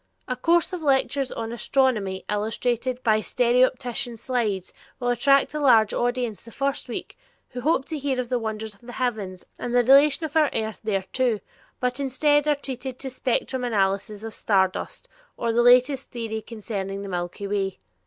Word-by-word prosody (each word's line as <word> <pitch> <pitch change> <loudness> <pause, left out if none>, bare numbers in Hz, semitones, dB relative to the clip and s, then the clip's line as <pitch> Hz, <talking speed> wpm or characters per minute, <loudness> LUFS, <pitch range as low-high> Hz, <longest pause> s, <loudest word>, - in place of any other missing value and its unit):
A 255 - -1
course 335 +7 +2
of 360 - -3
lectures 275 -2 +1
on 225 0 -4
astronomy 235 -6 0
illustrated 240 +4 -1
by 215 -2 +4
stereopticon 245 0 +1
slides 220 -7 -2 0.3
will 245 -1 -1
attract 275 +4 +3
a 300 - -2
large 230 -7 +5
audience 245 -3 -1
the 230 - -12
first 275 +4 -2
week, - - -5 0.3
who 250 - -6
hope 280 -1 +1
to 315 -2 -4
hear 270 -2 -1
of 250 - -2
the 250 0 0
wonders 220 -1 -4
of 200 - -23
the 245 0 -10
heavens 215 -8 -3
and 245 0 -3
the 245 - +5
relation 280 +5 +5
of 310 - -7
our 310 -3 +4
earth 220 -1 -2
thereto, 215 +3 0 0.4
but 250 +1 -1
instead 290 +2 +2
are 295 - +4
treated 265 -2 -6
to 265 -1 -6
spectrum 255 0 -1
analyses 205 -1 0
of 225 -1 -6
star 195 -3 +3
dust, - - -8 0.3
or 230 -1 -1
the 240 - +4
latest 250 +2 +4
theory 225 -2 -4
concerning 200 -3 -5
the - - -6
milky 175 +1 -4
way. 195 -1 -1
245 Hz, 175 wpm, -25 LUFS, 215-265 Hz, 0.4 s, large